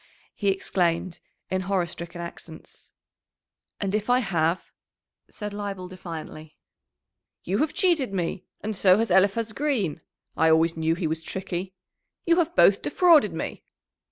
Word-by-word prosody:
he 200 - -3
exclaimed 180 -2 0 0.3
in 185 0 0
horror 185 -1 0
stricken 170 +1 -8
accents. 165 -1 -10 0.9
"And 195 -1 -2
if 215 +2 -1
I 245 - +5
have?" 175 -7 0 0.6
said 210 -1 -6
Leibel 200 -3 -5
defiantly. 160 -4 -9 0.9
"You 195 +4 -1
have 310 - 0
cheated 340 - +2
me! 180 -2 -3 0.2
And 215 0 -3
so 185 -1 +5
has 225 +1 0
Eliphaz 210 +4 +3
Green 225 - -1 0.3
I 160 - +3
always 160 +1 +3
knew 160 0 +1
he 175 - -3
was 160 0 -1
tricky! 185 +2 -5 0.5
You 335 0 +4
have 340 0 +1
both - - +5
defrauded 325 - +4
me!" 160 - -5
190 Hz, 140 wpm, -25 LUFS, 170-215 Hz, 0.9 s, I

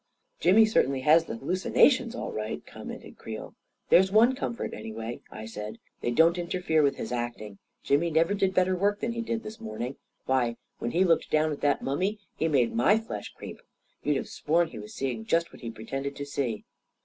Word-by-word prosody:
"Jimmy 205 +5 +6
certainly 135 -11 +2
has 160 +4 +5
the - - -5
hallucinations, 235 - +3
all - - -4
right 105 -9 -4
I - - -15
" - - -18
commented - - -9
Creel. - - -7 0.4
"There's 190 +2 +6
one 230 +5 +6
comfort, 235 -2 -4
anyway," 110 +2 -6
I 110 - -8
said; 105 -1 -6 0.2
"they - - 0
don't 165 +8 +4
interfere 170 -2 +1
with 140 -2 +2
his - - -5
acting. 120 -4 -4 0.2
Jimmy 145 +5 +2
never 165 +4 +3
did 195 -2 +1
better 185 0 +3
work 205 +3 +1
than 235 - -1
he 235 0 -3
did 230 0 -3
this 220 +2 -9
morning. 140 - -5 0.3
Why, 120 -3 +1 0.2
when 120 - -2
he 175 +8 +3
looked 170 -3 +2
down 155 0 +2
at 145 - -5
that 145 -1 +2
mummy, 185 +10 0 0.2
he 160 - 0
made 130 -7 +2
my 120 - +4
flesh 225 0 -6
creep. - - -9 0.4
You'd 150 -2 +1
have - - -4
sworn 165 +2 +1
he 115 - -9
was 105 0 -10
seeing 125 -5 -2
just 165 +8 0
what - - -13
he 115 - -5
pretended 135 +5 -5
to 145 - -5
see." 135 -6 -3
155 Hz, 205 wpm, -28 LUFS, 120-190 Hz, 0.4 s, Jimmy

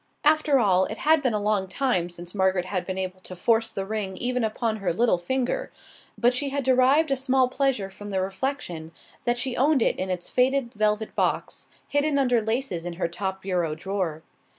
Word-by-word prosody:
After 305 -2 +4
all, 190 -4 +3
it 220 - -5
had 315 0 +3
been 255 -6 +1
a - - +1
long 205 -2 0
time 185 -6 0
since 175 0 -8
Margaret 190 -2 +1
had 185 -2 -3
been 190 -1 -3
able 185 0 -3
to 185 0 -8
force 225 +5 +2
the 195 - -4
ring 195 -2 -3
even 250 +2 0
upon 220 0 -1
her 195 -4 -1
little 200 0 +2
finger, 260 - -2 0.5
but 245 +1 +3
she 280 +2 0
had 280 0 -2
derived 265 +4 +4
a - - +4
small 260 -1 +2
pleasure 255 -7 0
from 205 +1 -9
the 190 -1 -1
reflection 190 - -3 0.3
that 240 0 +1
she 250 0 -2
owned 275 -1 +3
it - - +1
in 185 - -2
its 180 -1 -3
faded 255 -1 +1
velvet 215 0 0
box, - - -1 0.2
hidden 290 0 +1
under 250 -4 +3
laces 220 -5 -2
in 175 0 -4
her 170 0 -1
top 190 +2 -4
bureau 175 -5 -1
drawer. 170 -3 -3
215 Hz, 200 wpm, -25 LUFS, 185-260 Hz, 0.5 s, After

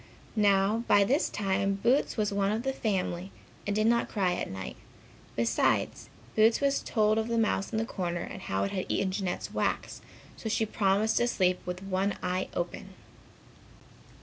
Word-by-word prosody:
Now, 205 +1 +3
by 205 - +6
this 270 +9 +2
time 195 0 0
Boots 250 +9 +1
was 210 -2 0
one 200 0 +1
of 220 +2 -1
the 270 0 -1
family 190 -5 -2 0.4
and 205 - 0
did 215 0 +2
not 235 +1 +2
cry 190 -4 +1
at - - -3
night. 95 -1 -6 0.6
Besides 115 0 +1 0.3
Boots 225 +1 +5
was 280 0 +2
told 215 -1 +2
of 220 - -1
the 235 0 0
mouse 220 -3 +1
in - - -1
the 225 - 0
corner 175 -6 -3
and - - -7
how 95 0 -1
he 100 - -2
had 185 - -1
eaten 195 -1 +1
Jeanette's 185 -2 -3
wax, - - -1 0.4
so 220 - -4
she 220 +1 +1
promised 205 +1 +1
to 240 - +3
sleep 185 -6 +2
with 180 +1 -4
one 195 +1 0
eye 180 +1 -1
open. 180 +2 -4
200 Hz, 175 wpm, -29 LUFS, 185-220 Hz, 0.6 s, by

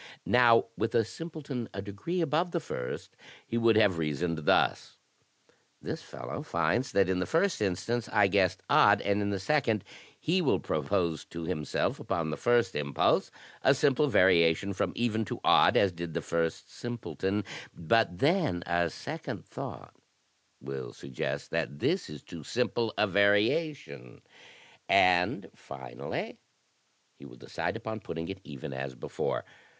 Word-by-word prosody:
Now, 120 -2 +5
with 110 - -2
a 115 -2 +4
simpleton 145 -4 -6
a 100 - -3
degree 105 - -3
above 165 +3 +1
the 170 - +1
first, 65 - -6 0.3
he - - -5
would 115 -1 +4
have 100 -6 +4
reasoned 80 +1 -2
thus; - - +2 0.8
'This - - -5
fellow - - -7
finds 85 +10 0
that 100 -2 +4
in 95 -1 0
the 90 - -1
first 170 - +1
instance 110 +4 -1
I 105 -2 +4
guessed 95 -2 +2
odd, - - +5
and, 100 +1 +1
in 100 - -1
the 100 -1 -1
second, 115 -1 +1 0.4
he 180 +4 +1
will 150 - +2
propose 80 +1 -1
to 85 0 -7
himself, 75 -3 -1
upon 80 -2 -2
the - - -2
first 120 -1 +2
impulse, 70 -1 +1 0.3
a 135 - +5
simple 145 +1 +3
variation 90 - +4
from - - -1
even 110 -2 0
to - - -5
odd, - - +5
as 100 - +4
did 85 -2 -6
the - - 0
first 85 +2 -2
simpleton; 105 -1 -3 0.3
but 90 +2 +1
then 145 - +1
a 85 0 +1
second - - -6
thought - - -8 0.7
will 65 -2 -6
suggest 65 -3 -5
that 70 - -2
this - - 0
is 75 -2 -9
too 85 - -9
simple 115 - -1
a - - +4
varia 105 - +3
tion, 65 - -13 0.7
and 90 -1 +4
finally 65 -3 -7 0.8
he 70 - -12
will 60 -2 -14
decide - - -4
upon 110 0 -5
putting 80 -3 -6
it 95 0 -6
even 70 -2 -7
as 65 0 -5
before. - - -3
100 Hz, 155 wpm, -29 LUFS, 80-120 Hz, 0.8 s, Now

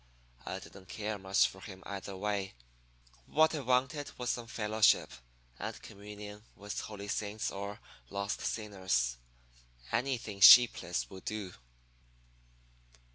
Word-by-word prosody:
I - - -3
didn't 95 -1 -12
care 105 0 -4
much 95 0 +3
for 95 - -5
him 95 -2 -10
either 100 -1 -6
way; 100 -3 -2 0.7
what 160 +2 +4
I 155 - -1
wanted 130 +2 +1
was 125 -1 -1
some 120 -1 -4
fellowship 110 -1 +3 0.5
and - - -5
communion 105 0 -10
with 105 +1 -5
holy 100 -1 -7
saints 105 +1 -2
or 100 +1 -6 0.3
lost 100 +1 -3
sinners 95 - -1 0.7
anything 120 -5 -1
sheepless 105 - +8
would 95 - -11
do. 105 -4 -4
105 Hz, 120 wpm, -32 LUFS, 100-110 Hz, 0.7 s, sheepless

